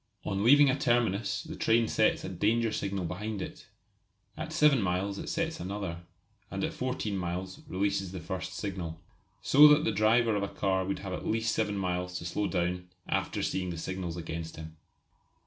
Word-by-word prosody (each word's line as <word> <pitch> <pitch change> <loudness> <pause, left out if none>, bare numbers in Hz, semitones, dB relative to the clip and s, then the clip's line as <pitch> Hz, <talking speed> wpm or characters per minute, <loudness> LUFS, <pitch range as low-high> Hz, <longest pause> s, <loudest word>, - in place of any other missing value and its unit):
On 100 +1 -1
leaving 145 +5 +7
a 130 - +3
terminus 120 -6 +1
the - - -7
train 115 0 +3
sets - - +2
a - - -4
danger 110 +5 +1
signal 100 -3 -2
behind 105 +5 -4
it; - - -7 0.7
at - - -5
7 150 -5 +4
miles 95 +1 -1
it - - -5
sets 165 -1 -2
another, 95 -3 -4 0.5
and 95 0 -3
at - - -1
14 125 -5 -2
miles 90 +1 -4
releases 95 0 -1
the 95 - -5
first 95 +3 -5
signal. 90 -5 -4 0.4
So 150 +2 +8
that 150 +1 +6
the - - +1
driver 110 +1 +3
of 100 - 0
a 100 - -1
car 95 -1 0
would 100 - -2
have 95 - -4
at - - -4
least 115 +1 +1
7 105 -2 0
miles 90 -1 -2
to 85 - -7
slow 100 +4 -1
down 90 -2 +1
in 90 0 -5 0.2
after - - -1
seeing 95 -1 -1
the 85 - -4
signals 90 0 -4
against 80 -1 -5
him. 80 0 -9
95 Hz, 190 wpm, -30 LUFS, 90-110 Hz, 0.7 s, So